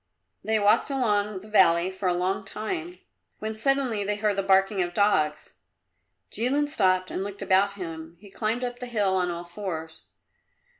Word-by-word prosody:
They 220 Hz, 0 st, +1 dB
walked 205 Hz, +7 st, +3 dB
along 210 Hz, -7 st, 0 dB
the 210 Hz, -, -13 dB
valley 185 Hz, -4 st, +4 dB
for 190 Hz, 0 st, -3 dB
a -, -, +2 dB
long 185 Hz, +3 st, -1 dB
time, 335 Hz, -, -5 dB, 0.4 s
when 215 Hz, +1 st, -4 dB
suddenly 250 Hz, -2 st, +1 dB
they 205 Hz, +1 st, -1 dB
heard 210 Hz, -1 st, 0 dB
the 195 Hz, -, 0 dB
barking 195 Hz, 0 st, +3 dB
of 175 Hz, -1 st, -3 dB
dogs. 155 Hz, -7 st, +1 dB, 0.8 s
Jilin 270 Hz, +7 st, +1 dB
stopped 185 Hz, -9 st, +1 dB
and 190 Hz, -, -2 dB
looked 200 Hz, 0 st, -6 dB
about 195 Hz, +1 st, +3 dB
him. 165 Hz, -3 st, -8 dB
He 200 Hz, 0 st, -15 dB
climbed 225 Hz, +4 st, -1 dB
up 245 Hz, 0 st, -4 dB
the 250 Hz, -, -6 dB
hill 205 Hz, -5 st, +1 dB
on 180 Hz, -1 st, +1 dB
all 170 Hz, 0 st, -4 dB
fours. 170 Hz, -3 st, -6 dB
200 Hz, 170 wpm, -26 LUFS, 185-220 Hz, 0.8 s, valley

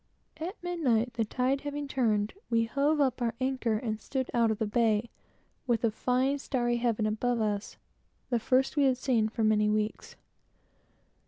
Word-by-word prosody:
At 340 Hz, +6 st, -5 dB
midnight, 255 Hz, -10 st, 0 dB
the 230 Hz, -1 st, 0 dB
tide 255 Hz, +5 st, 0 dB
having 290 Hz, 0 st, -4 dB
turned, 220 Hz, -6 st, 0 dB, 0.2 s
we 230 Hz, -1 st, +3 dB
hove 285 Hz, +6 st, +1 dB
up 265 Hz, -3 st, +1 dB
our 235 Hz, -1 st, 0 dB
anchor 260 Hz, -3 st, 0 dB
and 215 Hz, -1 st, -3 dB
stood 260 Hz, -2 st, -3 dB
out 235 Hz, -2 st, +3 dB
of 220 Hz, -, 0 dB
the 220 Hz, -, -1 dB
bay, 220 Hz, +1 st, +1 dB, 0.6 s
with 235 Hz, -2 st, +1 dB
a 230 Hz, -, +3 dB
fine 260 Hz, +5 st, 0 dB
starry 240 Hz, -3 st, 0 dB
heaven 235 Hz, -2 st, 0 dB
above 230 Hz, +3 st, 0 dB
us, 210 Hz, -1 st, -2 dB, 0.5 s
the 240 Hz, -, +2 dB
first 260 Hz, +5 st, +1 dB
we 290 Hz, -2 st, +3 dB
had 260 Hz, -2 st, +3 dB
seen 235 Hz, -5 st, +1 dB
for 225 Hz, +1 st, -2 dB
weeks 215 Hz, -, +4 dB
and 210 Hz, 0 st, +2 dB
weeks. 215 Hz, 0 st, -3 dB
240 Hz, 175 wpm, -29 LUFS, 220-265 Hz, 0.6 s, weeks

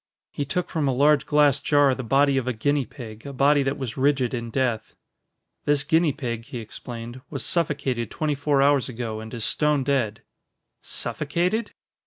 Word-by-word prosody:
He 145 Hz, -, -3 dB
took 180 Hz, +6 st, -1 dB
from 155 Hz, -4 st, 0 dB
a 135 Hz, -, +2 dB
large 145 Hz, +3 st, +3 dB
glass 145 Hz, -2 st, +4 dB
jar 145 Hz, -2 st, +4 dB
the 130 Hz, -, -4 dB
body 135 Hz, +3 st, +3 dB
of 130 Hz, -2 st, 0 dB
a 125 Hz, -, +1 dB
guinea 140 Hz, +3 st, 0 dB
pig, 110 Hz, -4 st, -10 dB
a 140 Hz, -, -7 dB
body 140 Hz, +2 st, +3 dB
that 135 Hz, +1 st, -1 dB
was 130 Hz, -5 st, -5 dB
rigid 135 Hz, -2 st, +2 dB
in 115 Hz, -2 st, -3 dB
death. 115 Hz, -3 st, -1 dB, 0.7 s
"This 145 Hz, -1 st, +2 dB
guinea 160 Hz, +1 st, +3 dB
pig," 120 Hz, -5 st, -4 dB
he 125 Hz, -, -7 dB
explained, 120 Hz, +2 st, -8 dB
"was 140 Hz, -, -4 dB
suffocated 140 Hz, -, -1 dB
twenty 155 Hz, -1 st, -1 dB
four 145 Hz, -1 st, +2 dB
hours 140 Hz, -2 st, +3 dB
ago 115 Hz, -3 st, -4 dB
and 110 Hz, 0 st, -8 dB
is 115 Hz, -3 st, -3 dB
stone 150 Hz, -2 st, +1 dB
dead." 125 Hz, -6 st, 0 dB, 0.6 s
"Suffocated?" 195 Hz, +6 st, -1 dB
135 Hz, 180 wpm, -24 LUFS, 120-145 Hz, 0.7 s, glass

